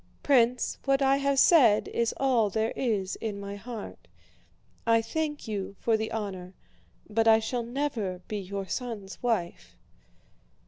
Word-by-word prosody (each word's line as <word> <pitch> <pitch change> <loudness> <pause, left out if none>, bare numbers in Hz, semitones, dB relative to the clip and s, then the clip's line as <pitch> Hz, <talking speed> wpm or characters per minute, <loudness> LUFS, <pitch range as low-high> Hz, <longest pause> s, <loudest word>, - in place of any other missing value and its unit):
'" - - -36
"Prince, 250 -3 +2
what 275 0 +2
I 270 0 +4
have 280 0 0
said 255 -9 +5
is 235 -1 0
all 245 -6 +2
there 220 +3 -1
is 205 -7 -1
in 210 -3 -4
my 200 0 -6
heart. 220 +1 -8 0.8
I 230 0 +5
thank 295 +5 -3
you 200 -2 -4
for 230 - +2
the 220 0 -2
honor, 190 -4 -5 0.5
but 225 +1 +1
I 220 0 +8
shall 225 +2 -2
never 235 -7 -3
be 210 - -3
your 195 0 -5
son's 220 -6 -5
wife." 175 - -2
225 Hz, 150 wpm, -28 LUFS, 200-250 Hz, 0.8 s, I